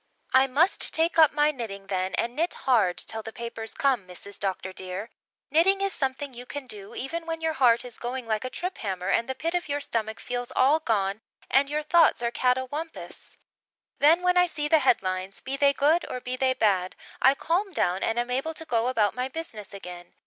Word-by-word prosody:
"I 260 +1 +6
must 310 +9 +2
take 330 +1 +2
up 315 -3 +7
my 295 0 +3
knitting 215 -8 -6
then 185 -1 -2
and 240 +1 -2
knit 335 +4 0
hard 215 -9 +3
till 220 0 -1
the 225 - -8
papers 225 -1 -6
come, 255 -9 +1
Mrs. 190 +2 -8
Dr. 190 -1 -3
dear. 190 +4 -6 0.4
Knitting 360 +6 +4
is 395 0 0
something 270 0 -2
you 245 +1 -9
can 285 -1 -6
do, 210 -2 -9
even 330 +6 -4
when 325 0 -3
your 320 0 -1
heart 250 -4 +3
is 245 -2 -10
going 245 +1 -4
like 220 0 -1
a 255 - -3
trip 360 +7 -5
hammer 190 -2 -3
and 235 - +1
the 265 - -2
pit 330 +5 -2
of 355 -3 -2
your 285 +1 0
stomach 220 -5 -3
feels 245 0 -4
all 280 +5 +4
gone 210 -7 0 0.3
and 275 +2 +4
your 300 +1 -1
thoughts 320 -5 +4
are 235 - 0
catawampus. 260 +7 -3 0.6
Then 325 +5 +5
when 360 0 +3
I 360 0 +5
see 295 -3 -2
the 315 +1 +5
headlines, 190 -7 0
be 270 - -4
they 280 0 +4
good 300 +5 +2
or 255 - -4
be 250 0 -4
they 260 0 +1
bad, 190 -6 +1 0.3
I 265 +2 +6
calm 365 +7 -1
down 185 - 0
and 225 - 0
am 240 +1 -1
able 275 +6 -2
to 320 - -7
go 235 -4 +1
about 220 -6 +2
my 250 +2 -2
business 265 -8 -7
again. 180 -3 -10
255 Hz, 215 wpm, -26 LUFS, 220-300 Hz, 0.6 s, up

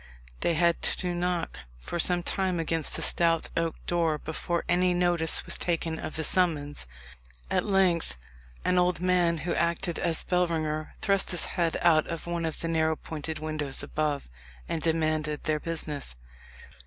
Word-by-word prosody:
They 170 - +1
had 170 +1 +3
to 180 -1 0
knock 175 - -1 0.2
for 115 - -5
some 175 +1 +4
time 185 -1 0
against 165 -1 -1
the - - -1
stout 165 -1 +3
oak 165 -1 0
door 165 -3 +1
before 165 +3 -3
any 180 +1 +3
notice 175 -2 +2
was - - -3
taken 165 -2 -1
of - - -5
the 160 - -2
summons. 150 - 0 0.6
At - - +1
length 185 - +2 0.5
an 180 - +3
old 180 -1 +2
man, 180 -2 +2
who 175 - 0
acted 170 +1 0
as 165 -2 0
bellringer, 160 -4 0
thrust 195 -1 +1
his 175 - +1
head 170 -2 +1
out 160 -3 +4
of 165 -1 -5
one 170 -1 -2
of 160 - -4
the 165 - -1
narrow 160 -1 +2
pointed 160 +1 -5
windows 155 -3 -2
above, 150 0 -1 0.4
and 165 - -2
demanded 155 -2 0
their 155 -1 0
business. 150 - -3
165 Hz, 160 wpm, -28 LUFS, 155-175 Hz, 0.6 s, some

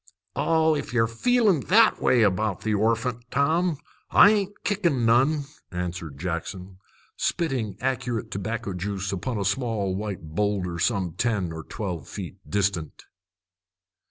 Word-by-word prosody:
"Oh, 160 -1 +3
if 145 - -4
ye're 115 -2 +4
feeling 205 - +2
that 220 +4 +5
way 120 -3 +4
about 105 0 +1
the 110 - 0
orphant, 115 +3 0
Tom, 160 +5 +1 0.3
I 205 - +8
ain't 205 -1 -2
kickin' 170 - +1
none," 135 +6 +3 0.3
answered 90 -5 -4
Jackson, 90 +3 -5 0.4
spitting 130 - -1
accurate 125 -3 -2
tobacco 105 +1 -3
juice 100 +1 -3
upon 110 +5 -3
a 100 - -1
small 100 -3 0
white 100 -3 -4
boulder 95 -3 -1
some 95 -3 +1
ten 95 -1 -1
or 80 0 -6
twelve 90 -7 -5
feet 95 -2 -7
distant. 100 -6 -1
110 Hz, 130 wpm, -25 LUFS, 95-135 Hz, 0.4 s, I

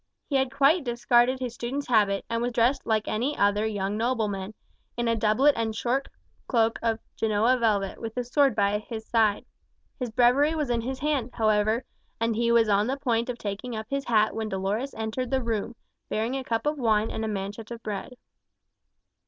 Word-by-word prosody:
He 285 - -3
had 265 -1 0
quite 280 +5 +3
discarded 240 +1 +2
his 250 -3 -4
student's 265 +5 -4
habit, 205 -5 +2
and 230 0 -2
was 245 0 -1
dressed 240 +4 +1
like 220 -1 +1
any 250 +7 -1
other 205 +2 +2
young 205 -1 -2
nobleman, 215 -4 -1 0.4
in 240 0 0
a 230 - +2
doublet 225 +7 +3
and 225 -1 -2
short 255 +5 -1 0.4
cloak 230 -3 +2
of 230 -1 +1 0.2
Genoa 220 +3 +2
velvet, 205 -4 0
with 225 +1 -6
a 250 - 0
sword 270 0 +2
by 200 +1 +2
his 220 0 -7
side. 220 -3 +2 0.5
His 250 -2 -2
Breviary 250 +7 +3
was 300 -5 -1
in 235 -1 +1
his 260 +3 -4
hand, 275 -3 -1
however, 215 +1 +1 0.3
and 230 0 0
he 235 +1 +1
was 230 -1 +4
on 205 +1 +2
the 270 +2 -1
point 235 -3 0
of 245 - -3
taking 215 +3 -5
up 220 0 -4
his 275 -1 -1
hat 215 -2 +3
when 220 -1 -3
Dolores 200 +8 -2
entered 220 +3 -3
the 265 0 0
room, 230 0 -2 0.3
bearing 225 +4 -1
a 270 - -3
cup 230 0 -2
of 295 0 0
wine 220 -3 +2
and 220 - -3
a - - -1
manchet 205 +1 -5
of 235 -1 -8
bread. 210 +4 -5
230 Hz, 195 wpm, -26 LUFS, 215-250 Hz, 0.5 s, was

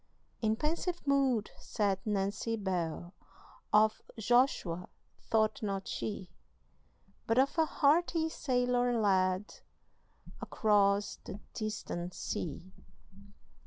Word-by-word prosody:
In 220 -1 +2
pensive 330 +6 -2
mood 270 -6 +2
sat 200 -3 -1
Nancy 200 +2 -1
Bell; 180 -4 -3 0.6
Of 215 +1 +4 0.2
Joshua 220 -7 +1 0.4
thought 220 -1 +2
not 195 -2 -3
she, 195 -4 -4 1.0
But 225 - +2
of 270 +2 +3
a 320 - +4
hearty 320 +3 +2
sailor 245 -5 +1
lad 190 -1 +2 0.9
Across 205 -1 +2
the 195 - -7
distant 180 -5 -4
sea. 180 +3 -5
215 Hz, 90 wpm, -32 LUFS, 195-250 Hz, 1.0 s, Of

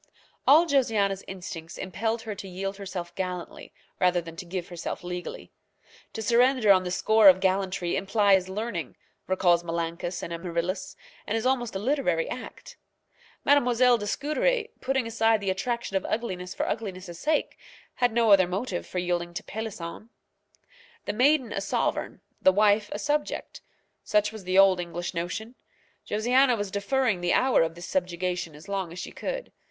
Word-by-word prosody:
All 310 +5 +7
Josiana's 220 - +1
instincts 175 -3 -7
impelled 220 +5 -2
her 220 -2 -4
to 195 -1 -8
yield 195 +2 -4
herself 185 -3 -6
gallantly 180 -1 -5 0.3
rather 180 -1 +3
than 165 -1 -8
to 180 - -6
give 175 0 -4
herself 175 0 -5
legally. 180 0 -6 0.6
To 220 - -4
surrender 240 0 +4
on 185 -1 +5
the 180 - -3
score 215 +3 +6
of 185 0 +5
gallantry 190 -2 0
implies 195 -2 +3
learning, 190 - -4 0.3
recalls 175 -2 +3
Menalcas 170 +1 -3
and 170 - -5
Amaryllis, 170 +2 -3 0.3
and 220 - 0
is 225 - -3
almost 245 -5 0
a - - +1
literary 210 - 0
act. 250 - -8 0.7
Mademoiselle 250 -3 +4
de 205 - -4
Scudéry, 440 - 0
putting 265 -2 0
aside 225 -1 +2
the 195 -2 -1
attraction 235 +1 -3
of 190 - +1
ugliness 185 -5 -3
for - - -1
ugliness' 185 -5 -5
sake, 310 0 0 0.3
had 245 -1 +1
no 230 -1 +3
other 190 -2 +6
motive 190 +1 -3
for - - -6
yielding 175 -1 -1
to 215 - -4
Pélisson. 215 -1 -6 1.0
The 205 - -2
maiden 255 0 +3
a 195 - -2
sovereign, 195 - -2 0.2
the 190 - +6
wife 205 +1 +3
a - - -3
subject, 295 +6 -2 0.4
such 210 0 +2
was 215 -4 -10
the 185 +1 +1
old 195 -2 +6
English 175 0 -4
notion. 180 +7 -4 0.6
Josiana 245 +4 +3
was 205 -2 -3
deferring 215 -1 0
the 175 0 +1
hour 260 0 +4
of 165 0 0
this 175 +1 -8
subjection 180 -2 -2
as 155 +6 -13
long 195 -4 -3
as 170 - -9
she 180 - -6
could. - - -5
195 Hz, 165 wpm, -27 LUFS, 180-230 Hz, 1.0 s, All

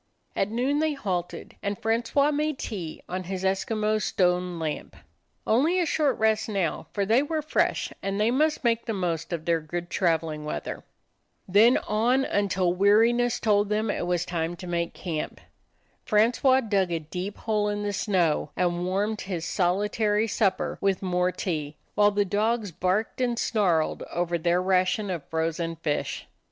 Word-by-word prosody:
At 195 - 0
noon 255 +6 0
they 315 -1 +1
halted, 180 -10 -4
and 200 0 -2
Francois 235 +6 +1
made 300 0 -1
tea 180 -11 -6
on 185 0 -4
his 190 +1 -4
Eskimo 215 +3 0
stone 180 -2 +1
lamp. 160 -2 -4 0.5
Only 305 +11 +3
a 350 - +2
short 300 -3 +1
rest 220 0 +1
now, 195 -6 -1
for 200 -1 -1
they 225 +6 +4
were 310 +1 -2
fresh, 305 - 0
and 195 +1 -2
they 215 +2 +3
must 305 +4 +1
make 235 -1 +1
the 225 - -1
most 165 -3 -2
of 165 -2 -3
their 165 -1 +1
good 175 +3 -5
traveling 160 -4 0
weather. 150 - -5 0.6
Then 215 +6 +6
on, 240 +6 +1
until 190 -3 +1
weariness 225 +5 +3
told 205 -2 +2
them 210 0 0
it 175 - -3
was 175 -1 0
time 170 0 -2
to 180 - -9
make 170 -1 -2
camp. 160 -4 -4 0.6
Francois 245 +4 +3
dug 200 -6 0
a 170 - +1
deep 180 +6 -6
hole 210 -2 0
in 205 0 -2
the 205 0 -2
snow, 180 -7 +1
and 175 0 0
warmed 205 +3 -1
his 180 -4 -4
solitary 210 +4 +1
supper 195 -4 0
with 195 -1 +1
more 180 0 +1
tea, 155 -5 -3 0.2
while 205 0 +5
the 205 0 +1
dogs 210 +1 0
barked 185 +9 -1
and 240 -2 0
snarled 180 -10 +1
over 170 0 -1
their 175 +2 +1
ration 185 +2 +1
of 170 -5 -4
frozen 165 +1 -1
fish. 155 -2 -3
195 Hz, 165 wpm, -26 LUFS, 175-220 Hz, 0.6 s, Then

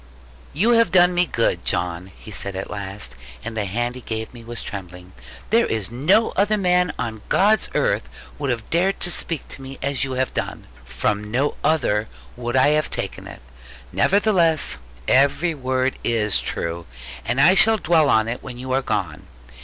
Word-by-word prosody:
'You 205 +11 +2
have 230 -6 +4
done 180 0 +5
me 175 0 +2
good, 115 -9 0
John,' 90 +1 -1
he 110 - -11
said 100 -1 -4
at 95 - -5
last, 100 0 -5 0.3
and 115 - -5
the 105 -2 -1
hand 120 +5 -1
he 125 - -9
gave 110 0 -5
me 120 -1 -11
was 120 0 -6
trembling: 90 -2 -8 0.4
'there 230 +1 +4
is 110 -2 -2
no 165 - +3
other 210 +2 +2
man 180 -3 +2
on 110 -3 -4
God's 215 +3 +3
earth - - +1 0.3
would 140 -2 -2
have 115 -3 -2
dared 185 +4 +1
to 175 - +2
speak 165 -4 -2
to - - -7
me 135 0 -8
as 140 -1 0
you 135 -1 -2
have 130 0 -1
done. - - -4 0.2
From 105 +11 -2
no 135 +6 0
other 120 -9 +1 0.3
would 120 0 -4
I 130 +2 +5
have 150 0 +1
taken - - -4
it. - - -11 0.5
Nevertheless 180 - +3 0.3
every 140 +5 +3
word 130 -2 -1
is 110 -3 +2
true; 85 0 -4 0.4
and 130 - -1
I 165 +7 +7
shall 215 +3 +4
dwell 160 -6 +3
on 110 -4 +3
it 120 +2 -4
when 125 -2 -8
you 130 +1 -6
are 135 +1 +2
gone. - - -3
130 Hz, 185 wpm, -22 LUFS, 110-170 Hz, 0.5 s, I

